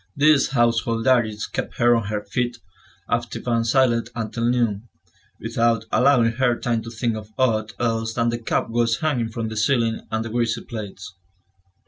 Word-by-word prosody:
These 145 -1 +4
household 115 -2 +1
duties 115 -5 +2
kept - - -5
her 120 0 +4
on 115 -3 -1
her 105 0 -3
feet, 120 +4 -2 0.5
active - - -2
and 115 -1 +1
silent, 120 -2 +2
until 115 0 -3
noon, 115 -3 0 0.5
without 115 0 0
allowing 125 -3 +4
her 125 -3 +2
time 115 -2 0
to 115 - -8
think 115 0 -2
of 105 -1 -8
aught 110 -5 +1
else 115 -1 -1
than 115 -1 +1
the 115 0 -2
cobwebs 115 0 0
hanging 130 -8 0
from 115 0 -4
the 110 - -6
ceiling 115 0 +1
and 110 0 -2
the - - -5
greasy 115 -1 0
plates. 105 -4 -8
115 Hz, 165 wpm, -22 LUFS, 110-120 Hz, 0.5 s, These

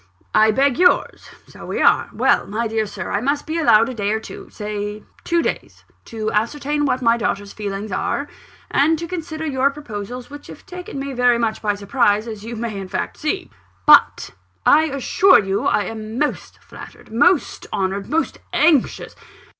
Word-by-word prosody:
"I 215 0 +5
beg 270 +6 +2
yours 360 0 +2 0.2
so - - -14
we - - -3
are. - - +3
Well, - - +2
my 225 +4 -2
dear 220 -1 -1
Sir, - - -6
I 205 - 0
must 285 +3 -1
be 320 +1 -2
allowed 230 -7 +5
a 260 - -5
day 205 -3 -1
or 220 - 0
two - - -10
say 210 0 -5 0.2
two 340 -1 +1
days - - -4 0.2
to 220 -1 -4
ascertain 290 +7 -1
what 255 -2 0
my 230 0 +4
daughter's 205 -3 -3
feelings 205 0 -5
are, 280 +9 -2 0.4
and 315 +3 +3
to 335 +2 -5
consider 320 -2 -5
your 275 -2 +1
proposals, 245 -4 -7
which 290 0 -10
have - - -12
taken 360 -5 -8
me 275 0 -4
very 245 -1 +3
much 225 -2 -1
by 210 -1 0
surprise, 205 0 +1
as 215 -2 -7
you 235 +1 -6
may 225 -1 -4
in 190 - -6
fact - - -3
see. 370 +5 -3 0.3
But - - +5 0.3
I 310 +2 +6
assure 315 +6 +4
you 195 -1 -1
I 210 - +2
am 220 +1 -6
most 295 +2 -2
flattered, - - -13
most 325 +8 +2
honoured, 195 +1 -2
most 320 +2 -1
anxious 305 -5 +2
235 Hz, 180 wpm, -20 LUFS, 215-295 Hz, 0.4 s, I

